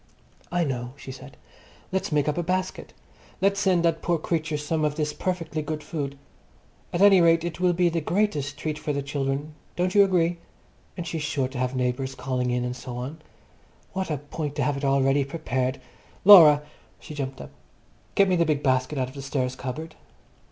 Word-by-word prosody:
"I 175 0 +1
know," 125 -4 -3
she 135 - -9
said. 130 - -12 0.5
"Let's 190 -2 -1
make 150 -1 +2
up 150 - +1
a - - +2
basket. 185 +2 -2 0.5
Let's 195 +1 +2
send 185 -4 +2
that 165 -1 +1
poor 170 -1 +1
creature 160 -1 -2
some 155 +2 -1
of 150 -1 0
this 150 -1 -1
perfectly 170 -3 -3
good 150 0 -4
food. 145 -3 -4 0.7
At 175 +3 +2
any 195 -3 +7
rate, 165 -1 +4
it 175 0 -4
will 180 -1 +3
be 175 +1 +3
the 165 -1 0
greatest 150 -5 0
treat 155 -1 -3
for 155 -1 -2
the 140 0 -2
children. 140 +1 -2 0.2
Don't 180 +1 0
you 205 - +7
agree? 175 -3 +1 0.6
And 175 - -4
she's 165 -1 -3
sure 145 -3 -1
to 130 -1 -6
have 125 +1 -1
neighbours 130 +1 -1
calling 125 -1 -2
in 125 0 0
and 125 0 -3
so 125 -1 -7
on. 140 +6 -6 0.7
What 190 -1 -2
a 150 - -1
point 145 +1 -5
to 145 - 0
have 145 +2 +1
it 140 - -6
all 135 -1 +3
ready 135 +1 +3
prepared. 130 -3 -2 0.5
Laura!" 155 -7 +9 0.4
She - - -10
jumped 135 -2 -4
up. - - -9 0.6
"Get 200 - +5
me 185 - +2
the 170 - +3
big 150 -3 0
basket 130 +2 +1
out 130 -1 -1
of - - -13
the 140 - -7
stairs 130 -2 -2
cupboard." 155 +5 -6
150 Hz, 200 wpm, -25 LUFS, 135-170 Hz, 0.7 s, Laura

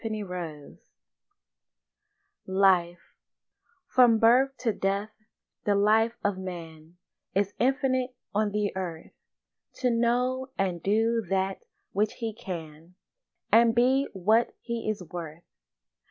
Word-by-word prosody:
LIFE 185 -3 +3 0.9
From 245 -3 +5
birth 250 +4 +4
to 230 -4 0
death 200 +2 -1 0.5
the 205 - +2
life 220 +3 +3
of 200 -2 0
man 165 -2 -9 0.4
Is 200 +1 +1
infinite 260 -1 +1 0.2
on 210 0 +1
the 205 -2 -1
earth, 175 -4 -5 0.6
To 250 -1 0
know 250 +3 +1
and 180 -3 -1
do 225 +4 +2
that 190 0 -1 0.3
which 210 +2 0
he 225 -2 -4
can 170 -5 -8 0.6
And 230 0 +5
be 260 +3 +3
what 215 +5 +2
he 235 -2 -3
is 205 -4 -3
worth. 165 -1 -8
210 Hz, 105 wpm, -27 LUFS, 185-235 Hz, 0.9 s, From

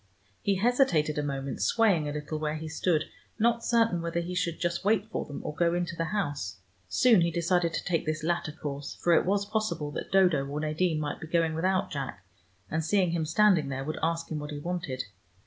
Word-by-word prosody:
He 200 - +1
hesitated 185 - +2
a - - +1
moment, 140 -5 -3
swaying 165 - +3
a - - -3
little 150 +1 -4
where 155 0 -1
he 160 0 -5
stood, 155 0 +1 0.3
not 235 +1 +2
certain 225 -7 +2
whether 170 0 -1
he 175 +1 -4
should 180 -2 -1
just 170 +1 -1
wait 205 0 +2
for - - -2
them, 145 - -7
or - - -4
go 170 +2 +2
into 175 -1 -2
the 165 - -1
house. 145 - -2 0.3
Soon 230 -7 +5
he 170 - +3
decided 170 +1 +1
to - - -2
take 170 -2 -1
this 155 0 -1
latter 170 -1 0
course, 145 -1 -6
for 175 - +2
it 170 - +3
was 200 +1 +2
possible 210 -8 -2
that - - -6
Dodo 180 -7 +4
or 145 +2 -3
Nadine 155 +2 0
might 150 -1 -3
be 160 - -6
going 165 -1 +1
without 185 +4 0
Jack, 135 - -5 0.4
and 160 +1 -1
seeing 180 +1 +2
him 165 -2 0
standing 170 -4 +4
there 135 0 -3
would 155 +3 -4
ask 165 0 -1
him 155 - -2
what 150 0 -6
he 150 - -5
wanted. 145 -5 -3
165 Hz, 215 wpm, -28 LUFS, 150-185 Hz, 0.4 s, Soon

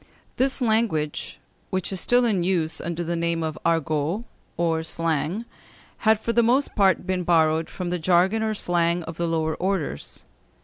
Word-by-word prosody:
This 265 +1 0
language, 220 -10 0 0.3
which 190 -1 -2
is 185 - 0
still 245 0 +3
in 200 -7 +1
use 170 -3 0
under 170 0 -3
the 170 +1 -2
name 170 0 -1
of 155 -1 -3
argot, 165 +4 0 0.3
or 165 -1 +1
slang, 165 +5 -1 0.5
had 220 -1 +3
for 230 +1 -2
the 235 - +4
most 250 +5 +2
part 195 -4 +3
been 185 -1 -1
borrowed 160 -2 +2
from 180 -2 -4
the 180 - -1
jargon 185 +6 +3
or 220 -1 0
slang 175 -2 +1
of 165 0 -8
the 170 - -1
lower 160 -1 0
orders. 180 - -3
175 Hz, 170 wpm, -24 LUFS, 160-205 Hz, 0.5 s, the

